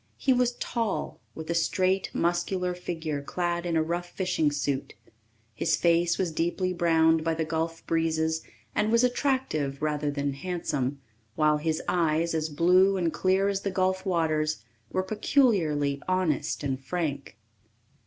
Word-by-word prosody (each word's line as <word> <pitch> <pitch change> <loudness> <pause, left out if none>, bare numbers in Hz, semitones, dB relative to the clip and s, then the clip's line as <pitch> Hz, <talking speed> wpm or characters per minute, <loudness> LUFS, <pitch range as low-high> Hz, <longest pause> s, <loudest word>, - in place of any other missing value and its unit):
He 265 - +2
was 250 -1 +2
tall, 230 -5 -3 0.2
with 160 +1 -5
a - - +2
straight, 185 +3 +1
muscular 180 +1 0
figure 160 -4 -4
clad 175 +3 -2
in 165 -1 +1
a 160 - +3
rough 175 +2 -3
fishing 180 -6 0
suit. 140 -1 -2 0.6
His - - +1
face 170 0 +2
was 180 -3 0
deeply 175 +3 -1
browned 160 -2 +3
by 165 0 0
the 160 0 -1
gulf 165 +1 -3
breezes 160 -1 0 0.3
and 215 +1 +1
was 230 +1 +4
attractive 250 - 0
rather 150 -1 -1
than 140 -1 -2
handsome, 140 -4 -3 0.4
while 155 -1 +3
his 155 +1 -1
eyes, 165 -1 +1
as 160 -1 -1
blue 180 +5 +4
and 170 -3 0
clear 190 +1 +2
as 200 -1 -1
the 200 - -1
gulf 185 0 0
waters, 155 - 0 0.3
were 185 - 0
peculiarly 185 - +1
honest 185 -7 0
and 135 -1 -2
frank. 140 - -3
170 Hz, 150 wpm, -27 LUFS, 155-185 Hz, 0.6 s, was